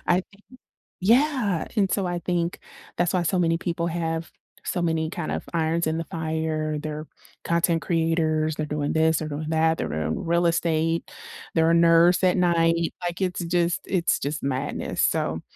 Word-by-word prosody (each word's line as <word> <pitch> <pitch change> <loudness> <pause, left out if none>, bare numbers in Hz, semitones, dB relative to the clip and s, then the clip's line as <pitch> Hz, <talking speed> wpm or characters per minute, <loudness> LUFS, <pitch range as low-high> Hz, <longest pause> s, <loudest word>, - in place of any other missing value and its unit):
I 180 +1 +3
think 200 - -21 0.6
yeah, 230 - +2
and 195 -3 +2
so 195 -3 0
I 175 0 -2
think 175 0 -1 0.4
that's 175 +1 +1
why 180 - +2
so 180 +3 +1
many 165 -1 +2
people 170 -1 -2
have 165 -1 -3 0.4
so 180 - -1
many, 160 -1 0
kind 175 -4 -4
of, - - -3
irons 165 0 0
in 160 +1 0
the 165 - -3
fire, 160 -2 -2
they're 155 +1 -5 0.4
content 170 0 +1
creators, 160 -2 +1
they're 155 - -2
doing 150 0 -2
this, 160 0 +3
they're 155 - -4
doing 155 +1 -4
that, 160 0 +2
they're - - -3
in 80 - -3
real 170 +1 +2
estate, 165 0 0 0.4
they're 165 0 +4
a - - +4
nurse 170 +2 +5
at 180 +1 +4
night, 165 -1 +2
like, 175 +1 -3
it's 180 -2 -1
just 175 0 +1
it's 180 -3 +1
just 150 +3 -3
madness, 135 +1 -2
so, 80 +1 0
165 Hz, 175 wpm, -25 LUFS, 160-175 Hz, 0.6 s, nurse